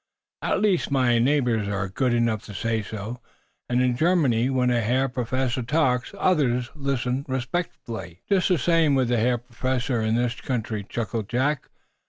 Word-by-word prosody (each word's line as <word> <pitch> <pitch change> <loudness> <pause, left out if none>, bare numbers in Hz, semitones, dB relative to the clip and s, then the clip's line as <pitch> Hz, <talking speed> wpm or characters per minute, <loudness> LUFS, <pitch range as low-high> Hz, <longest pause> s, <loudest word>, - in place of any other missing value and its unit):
At - - 0
least, 200 -5 +2
my 125 -4 +3
neighbors 120 -5 +2
are 100 -1 -1
good 125 +7 0
enough 115 -2 +1
to 105 - -9
say 115 +2 0
so. 110 +3 -6 0.5
And, 125 +1 +2
in 125 -1 +2
Germany, 135 -6 +2
when 125 -2 +2
a 120 -1 +2
herr 125 +5 +1
professor 130 0 -1
talks, 125 -1 0
others 125 -9 +1
listen 135 -2 -1
respectfully." 120 - -4
"Just 195 -2 +2
the 180 - +3
same 165 -3 +3
way 135 - +3
with 125 - 0
the 120 - +2
hair 120 +2 +2
professors 125 -1 -2
in 110 - +2
this 120 0 -1
country," 110 -4 -2
chuckled 115 -2 -3
Jack. 130 +4 0
125 Hz, 170 wpm, -25 LUFS, 115-135 Hz, 0.5 s, my